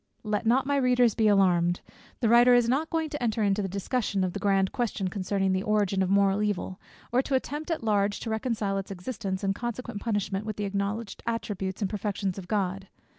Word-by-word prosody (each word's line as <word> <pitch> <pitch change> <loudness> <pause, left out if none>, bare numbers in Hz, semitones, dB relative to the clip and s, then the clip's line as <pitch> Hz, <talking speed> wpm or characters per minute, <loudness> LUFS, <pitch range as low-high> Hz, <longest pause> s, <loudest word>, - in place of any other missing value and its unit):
Let 210 +1 -1
not 260 +3 +3
my 285 0 +1
readers 250 -3 +3
be 220 -1 +2
alarmed! 180 -4 +3 0.4
The 230 - +3
writer 240 +2 +7
is 240 -1 +4
not 280 +6 +1
going 320 -2 -1
to 295 - -4
enter 225 -2 0
into 200 0 +2
the 195 - -2
discussion 200 +1 -1
of 185 -1 -1
the - - -4
grand 195 -2 +2
question 215 -6 -2
concerning 195 0 -1
the 185 - 0
origin 205 -2 +1
of 185 - +1
moral 200 0 +3
evil, 200 -2 -2 0.3
or 245 +2 +3
to 270 0 -1
attempt 295 +4 -3
at 325 -7 -2
large 205 -2 +1
to 225 - -4
reconcile 220 -3 -1
its 195 - -7
existence 195 0 -4
and 195 0 +1
consequent 240 -1 -5
punishment 205 -3 -1
with 215 -1 -4
the 210 - -3
acknowledged 200 +2 -3
attributes 205 -4 -3
and 195 - 0
perfections 200 -2 -2
of 180 - -10
God. 195 -1 -1
205 Hz, 210 wpm, -27 LUFS, 195-235 Hz, 0.4 s, writer